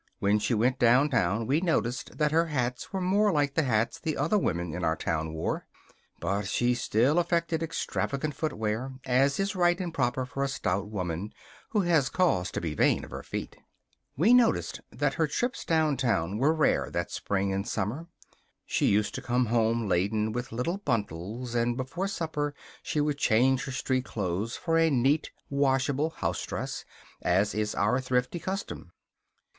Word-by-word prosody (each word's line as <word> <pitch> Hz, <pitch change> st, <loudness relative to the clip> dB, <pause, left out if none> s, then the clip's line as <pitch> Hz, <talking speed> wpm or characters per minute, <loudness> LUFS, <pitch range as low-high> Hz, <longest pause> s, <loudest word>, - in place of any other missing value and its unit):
When 100 Hz, +1 st, +2 dB
she 115 Hz, +3 st, 0 dB
went 125 Hz, +4 st, +1 dB
downtown 115 Hz, -4 st, +3 dB
we 140 Hz, +7 st, +2 dB
noticed 130 Hz, -8 st, -1 dB
that 150 Hz, -1 st, +2 dB
her 165 Hz, +2 st, +3 dB
hats 125 Hz, -5 st, -2 dB
were 190 Hz, -, -2 dB
more 200 Hz, +3 st, +3 dB
like 145 Hz, -4 st, +1 dB
the 160 Hz, -, +2 dB
hats 115 Hz, -5 st, 0 dB
the 155 Hz, -2 st, -2 dB
other 150 Hz, +9 st, +1 dB
women 85 Hz, -, 0 dB
in 90 Hz, +1 st, -4 dB
our 80 Hz, -1 st, +2 dB
town 80 Hz, -1 st, -2 dB
wore; 80 Hz, 0 st, -3 dB, 0.5 s
but 100 Hz, +4 st, -1 dB
she 120 Hz, +4 st, +2 dB
still 125 Hz, +6 st, +2 dB
affected 170 Hz, -1 st, 0 dB
extravagant 155 Hz, -2 st, -2 dB
footgear, 125 Hz, -3 st, -2 dB
as 135 Hz, +4 st, +2 dB
is 195 Hz, +1 st, 0 dB
right 175 Hz, 0 st, +3 dB
and 175 Hz, -3 st, -3 dB
proper 130 Hz, -3 st, 0 dB
for 135 Hz, +2 st, -3 dB
a -, -, +1 dB
stout 100 Hz, -7 st, -2 dB
woman 90 Hz, 0 st, -4 dB, 0.4 s
who 210 Hz, -, +2 dB
has 165 Hz, -7 st, +2 dB
cause 170 Hz, -, +1 dB
to -, -, -1 dB
be 80 Hz, -3 st, -3 dB
vain -, -, +2 dB
of -, -, -15 dB
her -, -, -5 dB
feet. -, -, -6 dB, 0.6 s
We 200 Hz, -, +5 dB
noticed 245 Hz, -2 st, +3 dB
that -, -, 0 dB
her -, -, +1 dB
trips 245 Hz, +1 st, -2 dB
downtown 130 Hz, -, +1 dB
were 140 Hz, +5 st, +4 dB
rare 160 Hz, -1 st, +2 dB
that -, -, -3 dB
spring 100 Hz, -1 st, -1 dB
and 100 Hz, +1 st, -2 dB
summer. 135 Hz, -, -2 dB, 0.6 s
She -, -, +1 dB
used 105 Hz, +1 st, +2 dB
to 130 Hz, -, -4 dB
come 125 Hz, 0 st, +1 dB
home 115 Hz, 0 st, +1 dB
laden 105 Hz, +4 st, +1 dB
with 120 Hz, +3 st, -4 dB
little 125 Hz, +11 st, -1 dB
bundles; 115 Hz, -, -3 dB
and 120 Hz, 0 st, +1 dB
before 145 Hz, +9 st, -3 dB
supper 150 Hz, -6 st, -2 dB, 0.3 s
she 150 Hz, -, -2 dB
would 145 Hz, -1 st, 0 dB
change 130 Hz, +4 st, +3 dB
her 135 Hz, -, -5 dB
street 130 Hz, 0 st, -1 dB
clothes 100 Hz, +1 st, -2 dB
for 165 Hz, -1 st, +1 dB
a 165 Hz, 0 st, +4 dB
neat, 140 Hz, +3 st, +2 dB, 0.2 s
washable 140 Hz, +2 st, +1 dB
housedress, 160 Hz, -, -4 dB, 0.4 s
as 95 Hz, +4 st, +2 dB
is 105 Hz, 0 st, -1 dB
our 105 Hz, +7 st, +2 dB
thrifty 125 Hz, +5 st, 0 dB
custom. 190 Hz, -, -5 dB
130 Hz, 170 wpm, -28 LUFS, 105-155 Hz, 0.6 s, We